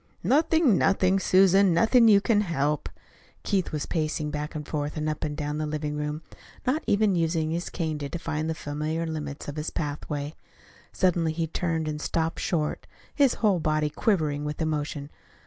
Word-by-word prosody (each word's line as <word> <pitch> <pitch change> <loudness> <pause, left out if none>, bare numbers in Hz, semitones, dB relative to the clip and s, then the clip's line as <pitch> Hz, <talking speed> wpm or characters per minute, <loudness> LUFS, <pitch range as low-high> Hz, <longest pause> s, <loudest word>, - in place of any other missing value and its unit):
"Nothing, 290 - +3
nothing, 195 0 +3
Susan. 190 -1 +5
Nothing 230 +6 +5
you 205 -2 +6
can 210 -1 +3
help." 150 -6 -1 0.5
Keith 195 -4 0
was 150 -2 -2
pacing 155 -2 -2
back 150 +2 -4
and 150 -1 -5
forth 150 0 -3
and 155 0 -1
up 155 -1 -2
and 150 -1 -3
down 150 0 -3
the 155 - -1
living 150 0 -3
room, 150 +1 -3 0.4
not 275 +5 +1
even 205 -1 +3
using 165 -2 0
his 170 +2 -2
cane 160 -3 -3
to 140 -1 -4
define 160 -1 -3
the 160 - -2
familiar 155 +3 -3
limits 150 -3 -5
of 145 +1 -6
his 150 +1 -2
pathway. 145 0 -4 0.6
Suddenly 170 -4 +1
he 165 0 -1
turned 160 -1 -2
and 150 0 -3
stopped 165 +1 -1
short, 155 -4 -1 0.3
his 275 -4 +3
whole 195 -4 +4
body 155 -1 0
quivering 150 -7 0
with 150 0 -4
emotion. 150 -2 -2
160 Hz, 175 wpm, -26 LUFS, 150-185 Hz, 0.6 s, you